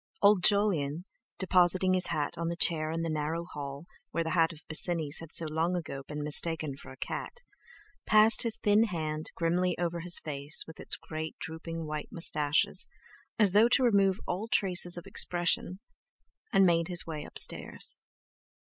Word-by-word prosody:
Old 200 -3 +5
Jolyon, 175 -7 +2 0.3
depositing 185 0 +3
his 185 -1 +2
hat 150 +2 -2
on 170 0 -3
the 170 - -2
chair 160 -2 0
in 165 +1 -3
the - - -2
narrow 155 +2 -3
hall, 140 -2 -8 0.2
where 165 - -2
that 160 - -4
hat 165 -2 +2
of 160 -1 -12
Bosinney's 160 -1 +3
had 165 -1 -10
so 165 - +2
long 160 +3 -1
ago 150 -6 -5
been 150 0 -5
mistaken 150 -1 +1
for 135 - -12
a 135 - -13
cat, 485 - -6 0.6
passed 215 0 +6
his 230 -2 -1
thin 210 +2 +3
hand 155 -6 -4
grimly 175 +1 0
over 175 -1 -2
his 170 0 +3
face 145 -1 -3
with 160 - -13
its - - -2
great 155 0 -7
drooping 165 0 -6
white 150 -1 -5
moustaches, 150 -3 0 0.5
as 210 -5 +5
though 215 +4 +5
to 255 +2 +3
remove 200 -4 +3
all 195 +5 -3
traces 180 -5 +2
of 175 - -8
expression, 175 0 0 0.7
and 195 - +5
made 170 -2 +2
his 175 -1 0
way 155 -2 -6
upstairs. - - 0
170 Hz, 170 wpm, -29 LUFS, 155-185 Hz, 0.7 s, passed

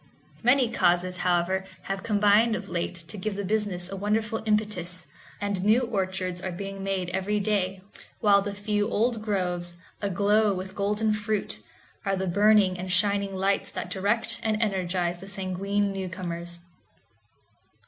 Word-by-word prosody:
Many 250 +1 +4
causes, 180 -4 +2
however, 180 +1 +1 0.2
have 195 0 -3
combined 210 +2 +4
of - - -5
late 175 +1 -2
to 210 - -4
give 205 +2 -2
the 200 0 -3
business 200 -3 0
a 195 - -6
wonderful 215 +2 0
impetus, 205 -4 0 0.3
and 200 -2 -1
new 215 +5 +5
orchards 190 -6 -2
are 190 - -3
being 195 +2 -6
made 190 -2 -1
every 190 +3 0
day, 195 -2 0 0.4
while 200 -2 +5
the 200 0 -4
few 205 +1 0
old 230 0 +1
groves, 180 -4 -1 0.3
aglow 205 +1 +3
with 185 +1 -6
golden 210 +2 +1
fruit, 210 0 -2 0.4
are 195 -1 +1
the 190 0 -2
burning 200 0 +4
and 185 0 -4
shining 200 +1 +2
lights 195 +1 +1
that - - -5
direct 220 +4 0
and 215 -1 0
energize 180 -4 0
the 195 - -10
sanguine 195 +1 -1
newcomers. 175 -2 -5
195 Hz, 150 wpm, -27 LUFS, 185-210 Hz, 0.4 s, new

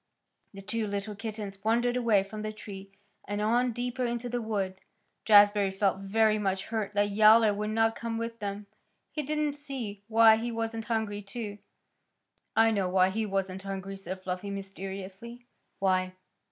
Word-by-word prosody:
The 195 - -9
two 215 +2 -2
little 200 +1 -3
kittens 205 -2 -6
wandered 240 +3 +2
away 230 -5 +3
from 210 +2 -8
the 215 0 -3
tree 195 -2 -9 0.4
and 205 0 -2
on 240 +4 +2
deeper 245 +2 -3
into 240 0 -2
the 245 0 -2
wood. 195 -4 -2 0.5
Jazbury 205 -1 +6
felt 195 0 +1
very 215 +2 +2
much 195 -2 -1
hurt 215 -2 -3
that 205 0 +2
Yowler 215 +1 +6
would 210 +1 -2
not 225 +1 +2
come 230 -1 -4
with 230 0 -4
them. 205 0 -4 0.5
He 305 - -2
didn't 300 0 -1
see 265 -9 -6
why 225 -1 +7
he 235 +2 -3
wasn't 225 -1 -3
hungry, 220 -3 -1
too. 205 0 -6 1.0
"I 225 0 +5
know 195 -4 0
why 185 0 +4
he 220 +2 -1
wasn't 190 -1 -2
hungry," 195 0 -5
said 190 -1 -7
Fluffy 185 +2 -4
mysteriously. 195 +4 -7 0.3
"Why?" 185 -1 +1
210 Hz, 165 wpm, -29 LUFS, 195-225 Hz, 1.0 s, why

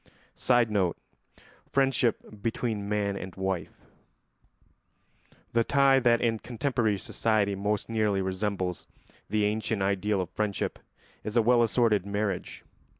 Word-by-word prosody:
[Sidenote: 110 -8 +2 0.7
Friendship 125 -6 0
between 110 -2 -2
man 100 -1 0
and 95 -1 -7
wife.] 95 -3 -4 1.7
The 115 0 +3
tie 135 +1 +4
that 120 -2 +3
in 115 -2 +1
contemporary 120 -4 -1
society 105 0 0
most 105 +1 -1
nearly 110 -3 +1
resembles 95 -1 -2 0.4
the 105 +1 +1
ancient 105 -1 -1
ideal 100 +1 0
of 90 -1 -3
friendship 100 -1 -2 0.4
is 110 +2 -2
a 115 - +5
well 120 +1 +4
assorted 115 -4 +2
marriage. 100 -2 -3
105 Hz, 115 wpm, -28 LUFS, 100-115 Hz, 1.7 s, a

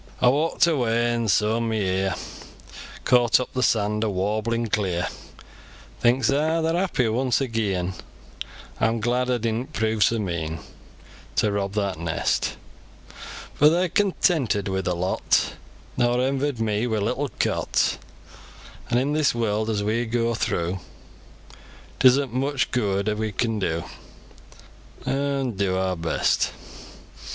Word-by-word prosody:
Aw 125 -1 +5
walk'd 160 +5 +2
away, 120 -6 +1
and 115 -2 -1
sooin 110 +3 +2
mi 110 - -1
ear 95 -1 0 0.9
Caught 120 -2 +4
up 125 - -5
the 130 - -1
saand 105 -2 +1
o' 110 - +1
warblin 110 +4 -1
clear; 95 -5 -1 0.9
Thinks 125 +3 +3
aw, 155 +4 +1
they're 160 0 +1
happy 175 -9 +1
once 125 +3 +1
agean; 105 -8 -1 0.9
Aw'm 115 +1 +1
glad 125 +3 0
aw 125 - +2
didn't 115 +5 -3
prove 110 -3 +1
so 115 - +3
mean 85 -6 -3 0.8
To 105 - +2
rob 100 -1 -2
that 100 -5 -1
nest; 85 -1 -1 1.0
For 150 - +5
they're 175 +3 +1
contented 165 - +1
wi 95 0 -1
ther 90 -1 -1
lot, 90 +2 +1 0.4
Nor 120 0 +2
envied 135 0 0
me 110 +1 0
mi 110 -2 0
little 125 +7 -1
cot; - - 0 0.9
An' 120 - +2
in 135 +4 +1
this 150 -5 +2
world, 110 -1 0
as 105 -2 -1
we 115 +3 0
goa 115 0 0
throo, 90 -4 -1 1.2
It - - 0
is'nt 130 -1 +5
mich 135 +1 0
gooid 105 -3 0
we 110 -1 -1
can 110 +1 -1
do, 85 -4 -1 1.2
An' 140 -2 0
do 100 -3 -1
awr 95 0 0
best. 80 -1 +1
115 Hz, 135 wpm, -24 LUFS, 100-130 Hz, 1.2 s, Aw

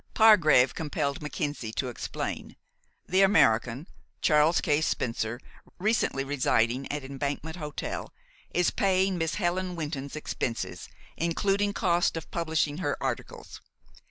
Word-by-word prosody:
Pargrave 170 - +6
compelled 145 -2 -2
Mackenzie 145 -6 -3
to 130 - -2
explain. 120 - -5 0.5
The 185 +2 +3
American, 135 - +3 0.3
Charles 155 +2 +4
K. 150 -3 +1
Spencer, 115 -5 -1 0.4
recently 205 -8 +1
residing 130 -2 +1
at 145 -1 -3
Embankment 140 +4 -4
Hotel, 150 -3 -5 0.4
is 180 0 +1
paying 190 -1 +1
Miss 165 0 -1
Helen 180 -1 -1
Wynton's 145 -4 -4
expenses, 125 -5 -4 0.3
including 195 +5 +1
cost 175 -4 +1
of 160 - -8
publishing 160 -2 0
her 185 - -1
articles. - - -5
155 Hz, 115 wpm, -28 LUFS, 140-180 Hz, 0.5 s, Pargrave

